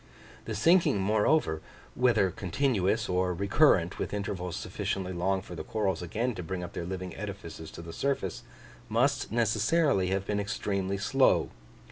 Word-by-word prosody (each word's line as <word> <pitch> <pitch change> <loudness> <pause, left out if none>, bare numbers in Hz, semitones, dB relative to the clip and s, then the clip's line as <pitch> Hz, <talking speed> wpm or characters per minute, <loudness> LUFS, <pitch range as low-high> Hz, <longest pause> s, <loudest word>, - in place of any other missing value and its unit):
The 110 - -4
sinking, 165 - +4
moreover, 105 - +2 0.3
whether 115 -7 +3
continuous, 105 +1 0
or 90 0 0
recurrent 100 - +3
with - - -2
intervals 90 -4 -3
sufficiently 95 -1 -3
long 95 +2 0
for - - -10
the - - -5
corals 95 -6 -1
again 115 +8 -1
to 95 - -6
bring 90 +1 -4
up 85 - -7
their 85 - -4
living 95 -1 -5
edifices 80 - -7
to 85 - -10
the 85 0 -8
surface, 135 -10 -2 0.5
must 120 +6 +1
necessarily 115 - +2
have 95 +1 -1
been 105 0 -1
extremely 100 -1 -2
slow. 100 - +3
100 Hz, 150 wpm, -29 LUFS, 90-110 Hz, 0.5 s, sinking